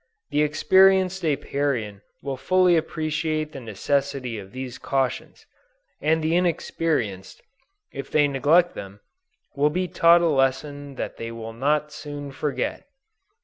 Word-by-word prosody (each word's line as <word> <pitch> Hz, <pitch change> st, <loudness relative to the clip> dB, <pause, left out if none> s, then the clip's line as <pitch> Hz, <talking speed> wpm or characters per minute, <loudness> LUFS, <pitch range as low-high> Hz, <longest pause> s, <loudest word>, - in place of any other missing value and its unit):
The 145 Hz, +1 st, +2 dB
experienced 190 Hz, +4 st, +4 dB
Apiarian 135 Hz, -8 st, -1 dB, 0.2 s
will 140 Hz, -1 st, -3 dB
fully 180 Hz, +6 st, +3 dB
appreciate 155 Hz, -1 st, -1 dB
the 135 Hz, -, -8 dB
necessity 125 Hz, +2 st, -2 dB
of 95 Hz, -1 st, -11 dB
these 130 Hz, 0 st, -7 dB
cautions, 135 Hz, -2 st, -2 dB, 0.6 s
and 160 Hz, +1 st, +1 dB
the 160 Hz, +2 st, +1 dB
inexperienced, 160 Hz, -, -1 dB, 0.5 s
if 140 Hz, 0 st, -7 dB
they 150 Hz, -1 st, +3 dB
neglect 150 Hz, +6 st, +3 dB
them, 100 Hz, +1 st, -9 dB, 0.6 s
will 145 Hz, +2 st, +3 dB
be 180 Hz, +4 st, -1 dB
taught 170 Hz, 0 st, +5 dB
a 170 Hz, -, +3 dB
lesson 140 Hz, 0 st, 0 dB
that -, -, -5 dB
they 115 Hz, 0 st, -5 dB
will 115 Hz, -1 st, -7 dB
not 150 Hz, +5 st, 0 dB
soon 145 Hz, -1 st, -7 dB
forget. 145 Hz, -, -3 dB
145 Hz, 130 wpm, -24 LUFS, 130-160 Hz, 0.6 s, taught